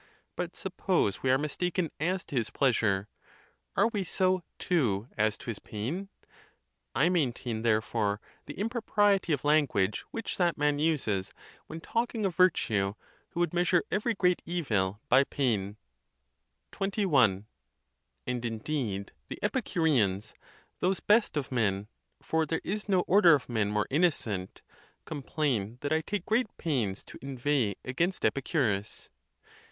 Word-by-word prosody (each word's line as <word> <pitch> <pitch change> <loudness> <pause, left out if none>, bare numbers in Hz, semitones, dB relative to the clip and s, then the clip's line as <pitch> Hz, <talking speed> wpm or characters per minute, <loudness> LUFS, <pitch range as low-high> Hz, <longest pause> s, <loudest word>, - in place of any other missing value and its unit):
But 175 -1 -4
suppose 180 - 0
we 130 - 0
are 130 - +5
mistaken 165 +3 -1
as 180 +5 0
to - - -8
his 115 -3 0
pleasure; 110 -7 +1 0.7
are - - +4
we 210 -4 -2
so, 185 +1 +1 0.2
too, 120 - +1
as 110 0 +1
to - - -13
his 115 -4 -4
pain? 145 - -4 0.9
I 150 - +4
maintain, 125 -9 0
therefore, 110 -2 +1 0.3
the - - -7
impropriety 205 -4 +1
of 145 -2 0
language 145 -10 +2
which 230 - -5
that 175 -2 +2
man 145 0 +1
uses, 130 -12 0 0.3
when 160 +1 -7
talking 230 +1 -1
of 190 - 0
virtue, 110 - +2 0.3
who - - -6
would 175 - +1
measure 175 0 +3
every 225 +2 0
great 180 -2 +2
evil 105 - -1
by 130 +2 +6
pain. 110 -8 -1 0.9
XXI. 155 - +2 0.8
And 125 -1 -2
indeed 115 -3 -3 0.2
the - - -6
Epicureans, 110 - +1 0.5
those 190 +1 +1
best 210 -6 +3
of 140 -3 -3
men— 105 -5 0 0.4
for 160 -1 0
there 160 - -1
is 210 +2 -3
no 185 -2 +4
order 180 -4 +6
of 140 - -4
men 110 -4 0
more 105 0 +1
innocent—complain 130 - -2
that 145 +1 0
I 160 - +2
take 195 +3 -3
great 230 +3 +2
pains 120 - -1
to - - -12
inveigh 130 -5 0
against 170 +9 0
Epicurus. 115 - -1
145 Hz, 135 wpm, -29 LUFS, 110-180 Hz, 0.9 s, by